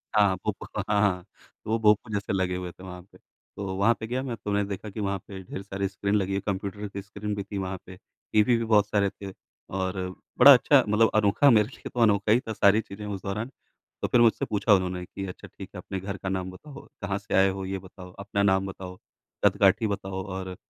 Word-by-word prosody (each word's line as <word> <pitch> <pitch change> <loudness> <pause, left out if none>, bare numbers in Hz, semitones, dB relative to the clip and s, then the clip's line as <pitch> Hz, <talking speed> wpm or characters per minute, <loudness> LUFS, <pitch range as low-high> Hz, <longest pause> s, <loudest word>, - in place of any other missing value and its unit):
हाँ, 100 -3 +4
भूप - - 0 0.2
व - - +1
हाँ, 105 -1 +3
हाँ, 90 -4 +1 0.4
वो 110 +1 +1
भोंपू 105 0 +3
जैसे 100 0 -2
लगे 95 -1 0
हुए 90 -1 -5
थे 90 - -16
वहाँ 90 -1 -8
पे। - - -17
तो 95 -2 -9
वहाँ 100 +5 +4
पे 110 - -5
गया 125 +3 -2
मैं, 125 -3 -4
तो 105 0 -5
मैंने 100 0 +1
देखा 100 +2 -5
कि 100 - -8
वहाँ 100 -1 -1
पे 95 -2 -8
ढेर 95 - -7
सारी 100 0 -3
स्क्रीन 100 +1 -2
लगी 100 -2 0
है, 100 - 0
कंप्यूटर 100 +1 -4
की 100 0 -7
स्क्रीन 105 +1 -5
भी 100 - -3
थी 100 +1 -6
वहाँ 95 0 -3
पे। 95 - -11 0.4
टीवी 110 +3 +4
भी 115 - -2
बहुत 105 -2 +4
सारे 100 -2 +1
थे 100 0 -9 0.5
और 95 0 -2 0.4
बड़ा - - +11
अच्छा - - +5
मतलब 105 +2 +4
अनोखा 105 +6 +4
मेरे 105 -4 +5
लिए 130 - -10
तो 125 - -4
अनोखा 105 -2 +3
ही 115 - +5
था 110 -3 -6
सारी 100 +1 +4
चीज़ें 105 0 -9
उस 100 -2 -5
दौरान, 105 +5 -3 0.5
तो - - 0
फिर 120 - +4
मुझसे 115 -2 +3
पूछा 105 +1 +2
उन्होंने 90 -2 0
कि, 95 +2 -7
"अच्छा 90 - -9
ठीक - - -11
है, - - -5
अपने 95 - -5
घर 100 +1 -5
का 95 - -5
नाम 95 -1 -3
बताओ, 140 +9 -12 0.2
कहाँ 100 -1 -2
से 100 - -7
आए 95 0 +5
हो 95 0 -4
ये 95 +1 -3
बताओ, 90 0 -12
अपना 100 0 -1
नाम 95 -1 +3
बताओ, 95 -1 -8 0.5
कद-काठी 100 +2 +4
बताओ 95 -2 -4
और 95 -1 -5
100 Hz, 240 wpm, -26 LUFS, 95-105 Hz, 0.5 s, बड़ा